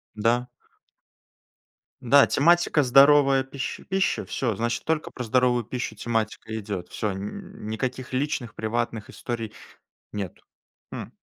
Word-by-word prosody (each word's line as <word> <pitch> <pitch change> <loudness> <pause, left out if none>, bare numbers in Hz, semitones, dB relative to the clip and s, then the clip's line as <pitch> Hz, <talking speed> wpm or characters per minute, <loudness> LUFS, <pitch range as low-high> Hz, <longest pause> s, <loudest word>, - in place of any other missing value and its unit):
Да. 120 +4 +1 1.5
Да, 140 +3 +6
тематика- 170 0 +4
здоровая 135 +1 +6
пищ 135 0 -5
пища. 195 0 +1
Всё, 115 -5 -1
значит, 115 +3 -2
только 160 -1 -1
про 125 - -6
здоровую 125 0 +2
пищу 125 +2 -4
тематика 110 -1 -2
идёт. 100 -4 -5
Всё, 105 - -2
н 105 - -7
никаких 125 +4 -3
личных 130 -4 -2
приватных 115 0 -2
историй 115 -3 -5 0.6
нет. 100 -4 -5 0.5
Хм. - - -6
120 Hz, 115 wpm, -25 LUFS, 110-135 Hz, 1.5 s, Да